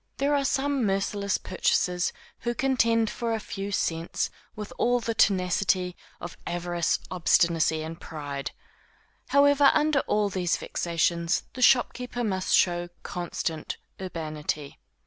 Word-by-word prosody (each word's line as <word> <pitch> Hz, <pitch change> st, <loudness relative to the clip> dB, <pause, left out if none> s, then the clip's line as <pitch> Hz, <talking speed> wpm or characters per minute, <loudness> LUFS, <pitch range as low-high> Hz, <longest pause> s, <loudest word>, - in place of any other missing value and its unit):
There 280 Hz, +2 st, +1 dB
are 285 Hz, -1 st, +2 dB
some 275 Hz, -1 st, +1 dB
merciless 200 Hz, 0 st, 0 dB
purchasers 180 Hz, -1 st, 0 dB, 0.3 s
who 240 Hz, 0 st, -2 dB
contend 230 Hz, -4 st, +2 dB
for 230 Hz, -1 st, -2 dB
a -, -, -2 dB
few 200 Hz, -1 st, -5 dB
cents 165 Hz, -3 st, -1 dB, 0.2 s
with 210 Hz, -1 st, -7 dB
all 245 Hz, +1 st, +3 dB
the 230 Hz, -1 st, -2 dB
tenacity 185 Hz, -3 st, +2 dB, 0.2 s
of 175 Hz, -, -7 dB
avarice, 175 Hz, -1 st, 0 dB
obstinacy 170 Hz, -3 st, +2 dB
and 165 Hz, +1 st, -7 dB
pride; 145 Hz, -3 st, -5 dB, 0.8 s
however, 285 Hz, 0 st, +5 dB
under 300 Hz, -1 st, +3 dB
all 210 Hz, -1 st, +2 dB
these 180 Hz, -3 st, 0 dB
vexations, 170 Hz, 0 st, 0 dB
the 255 Hz, -, -7 dB
shopkeeper 245 Hz, -1 st, +3 dB
must 190 Hz, -4 st, +1 dB
show 175 Hz, -1 st, +2 dB
constant 175 Hz, -2 st, -4 dB, 0.2 s
urbanity. 155 Hz, -5 st, -4 dB
190 Hz, 125 wpm, -27 LUFS, 170-240 Hz, 0.8 s, however